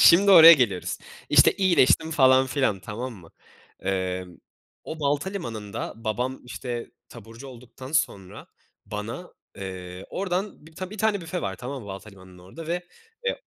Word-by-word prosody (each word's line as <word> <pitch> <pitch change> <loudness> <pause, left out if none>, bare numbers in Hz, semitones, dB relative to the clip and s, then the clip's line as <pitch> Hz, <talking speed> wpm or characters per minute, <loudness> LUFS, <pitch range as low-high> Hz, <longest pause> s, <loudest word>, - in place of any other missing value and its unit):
Şimdi 195 +4 +7
oraya 165 -3 +11
geliyoruz, 115 - +1 0.3
işte, - - +6
iyileştim 165 -4 +3
falan 130 -3 +5
filan, 130 -9 0
tamam 120 +6 -6
mı? 90 -6 -14 0.5
Emm, 95 -2 -3 0.5
o 160 - -7
Baltalimanı'nda 145 - -3
babam, 120 +4 -3
işte, 125 -1 -6 0.2
taburcu 115 +3 -12
olduktan 125 +2 -11
sonra 100 - -2 0.4
bana, 105 - -6 0.2
eee, 95 -1 -7
oradan 185 -3 -3
bi - - -14 0.2
bir 210 - -9
tane 210 -1 +1
büfe 170 +1 -5
var, 95 -1 -3
tamam 130 +3 -6
mı? 100 - -11
Baltalimanı'nın 95 -2 -11
orada 95 - -11
ve, 175 +2 -2 0.4
eee 475 - -1
125 Hz, 140 wpm, -25 LUFS, 100-160 Hz, 0.5 s, oraya